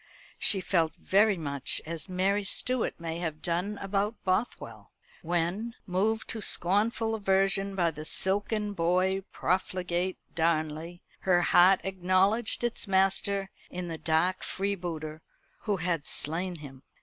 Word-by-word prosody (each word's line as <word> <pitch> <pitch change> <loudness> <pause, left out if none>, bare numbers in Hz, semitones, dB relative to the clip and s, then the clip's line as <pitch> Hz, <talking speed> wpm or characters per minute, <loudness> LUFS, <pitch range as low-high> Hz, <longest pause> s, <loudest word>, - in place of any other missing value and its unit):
She 195 - +4
felt 165 -4 +1
very 205 +1 +3
much 140 -4 -2
as 165 +3 -5
Mary 195 +3 +1
Stuart 250 +5 +2
may 165 0 -4
have 160 -3 -4
done 180 +5 -1
about 200 +3 -1
Bothwell; 185 +5 -2 0.3
when, 175 +7 -2
moved 215 +4 0
to 220 - -2
scornful 215 +5 +1
aversion 195 -1 +1
by 170 -3 +2
the 155 0 -8
silken 205 +5 0
boy 185 +2 +1
profligate 180 0 -1 0.2
Darnley, 160 +1 -1 0.2
her 175 -2 +2
heart 180 +2 +6
acknowledged 195 +5 +2
its 240 -2 -1
master 195 +1 +1 0.2
in 180 -1 -5
the 165 -1 -5
dark 165 +3 +1
freebooter 170 -5 -4 0.4
who 205 -3 +1
had 170 -3 -1
slain 175 +4 -1
him. 140 -4 -10
185 Hz, 125 wpm, -29 LUFS, 170-200 Hz, 0.4 s, heart